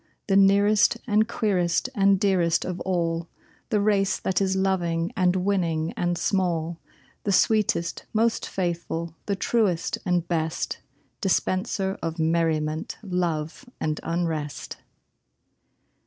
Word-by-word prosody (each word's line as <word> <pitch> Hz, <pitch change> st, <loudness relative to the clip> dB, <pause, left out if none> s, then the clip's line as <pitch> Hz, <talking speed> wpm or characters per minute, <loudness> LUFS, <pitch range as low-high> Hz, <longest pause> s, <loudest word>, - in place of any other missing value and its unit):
The 195 Hz, -, +1 dB
nearest 200 Hz, +3 st, +5 dB
and 215 Hz, -1 st, +3 dB
queerest 195 Hz, -5 st, 0 dB
and 195 Hz, -3 st, +3 dB
dearest 180 Hz, -5 st, +2 dB
of 180 Hz, -1 st, -4 dB
all 170 Hz, -2 st, -1 dB, 0.4 s
The 210 Hz, -, +2 dB
race 200 Hz, -1 st, +2 dB
that 190 Hz, 0 st, 0 dB
is 190 Hz, -1 st, +1 dB
loving 175 Hz, -1 st, 0 dB
and 185 Hz, -3 st, +2 dB
winning 175 Hz, -4 st, 0 dB
and 175 Hz, 0 st, 0 dB
small; 170 Hz, -4 st, 0 dB, 0.4 s
The 200 Hz, -, 0 dB
sweetest, 200 Hz, -4 st, +2 dB
most 225 Hz, +1 st, +1 dB
faithful, 170 Hz, -2 st, -3 dB
the 200 Hz, -, +1 dB
truest 195 Hz, -5 st, 0 dB
and 175 Hz, -2 st, 0 dB
best 160 Hz, -2 st, -2 dB, 0.4 s
Dispenser 190 Hz, 0 st, 0 dB
of 165 Hz, 0 st, -3 dB
merriment, 160 Hz, -1 st, 0 dB
love 175 Hz, -, -2 dB
and 155 Hz, -1 st, -1 dB
unrest! 165 Hz, -3 st, -3 dB
180 Hz, 115 wpm, -25 LUFS, 165-195 Hz, 0.4 s, nearest